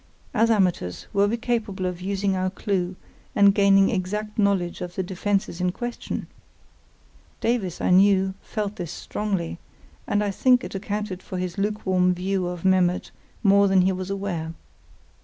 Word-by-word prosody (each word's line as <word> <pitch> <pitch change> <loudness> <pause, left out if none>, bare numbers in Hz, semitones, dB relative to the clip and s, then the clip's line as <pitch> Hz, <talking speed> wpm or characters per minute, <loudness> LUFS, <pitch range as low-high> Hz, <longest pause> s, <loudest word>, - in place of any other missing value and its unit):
As 225 +2 +3
amateurs, 180 - +1
were 200 0 +4
we 230 +3 0
capable 225 -5 -2
of 180 -1 -3
using 195 0 0
our 185 0 0
clue 185 -1 -2 0.4
and 200 -1 +6
gaining 195 -1 +5
exact 210 +2 -3
knowledge 195 -4 +1
of 180 0 -6
the 190 - -1
defences 190 -1 -1
in 180 0 +1
question? 240 +5 -5 1.1
Davies, 220 -7 -1
I - - +1
knew, 190 0 +5
felt 210 -1 -4
this 170 -3 -5
strongly, 185 -4 -3 0.5
and 205 0 +1
I 205 - 0
think 250 +5 +3
it - - -6
accounted 200 -1 -4
for 185 - -6
his 180 0 -3
lukewarm 190 -3 +1
view 185 0 -1
of 175 0 -5
Memmert 185 -1 +2 0.3
more 200 -1 +5
than 190 -1 +4
he 190 - +3
was 185 0 -4
aware. 180 -5 -3
195 Hz, 160 wpm, -24 LUFS, 180-205 Hz, 1.1 s, and